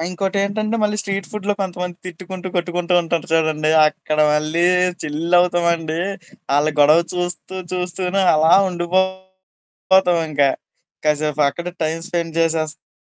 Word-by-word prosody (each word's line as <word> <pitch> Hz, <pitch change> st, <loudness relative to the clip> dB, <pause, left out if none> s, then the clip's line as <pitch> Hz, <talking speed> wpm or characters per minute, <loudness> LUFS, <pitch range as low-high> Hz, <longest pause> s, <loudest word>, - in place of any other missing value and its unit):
ఆ! -, -, -2 dB
ఇంకోటేంటంటే, 200 Hz, +4 st, -1 dB
మళ్ళీ 210 Hz, 0 st, +1 dB
స్ట్రీట్ 195 Hz, -2 st, -4 dB
ఫుడ్‌లో 205 Hz, -1 st, -2 dB
కొంతమంది 180 Hz, -1 st, -4 dB
తిట్టుకుంటూ, 185 Hz, +1 st, -7 dB
కొట్టుకుంటూ 175 Hz, 0 st, -2 dB
ఉంటారు 165 Hz, -1 st, -2 dB
చూడండి 155 Hz, -1 st, +1 dB, 0.2 s
అక్కడ 155 Hz, 0 st, -3 dB, 0.2 s
మళ్ళీ 155 Hz, +3 st, 0 dB, 0.4 s
చిల్లవుతామండీ. 170 Hz, +1 st, +1 dB, 0.6 s
ఆళ్ళ 150 Hz, +1 st, +2 dB
గొడవ 150 Hz, +3 st, +6 dB
చూస్తూ 180 Hz, +1 st, -4 dB, 0.2 s
చూస్తూనే 180 Hz, +1 st, -1 dB
అలా 160 Hz, +2 st, +4 dB, 0.2 s
ఉండిపోతామింక. 185 Hz, -2 st, -1 dB, 0.7 s
కసేపక్కడే 150 Hz, +2 st, 0 dB
టైమ్ 160 Hz, +1 st, -2 dB
స్పెండ్ 165 Hz, -1 st, -3 dB
చేసేస్తాం. 155 Hz, -, -2 dB
175 Hz, 105 wpm, -19 LUFS, 155-190 Hz, 0.7 s, గొడవ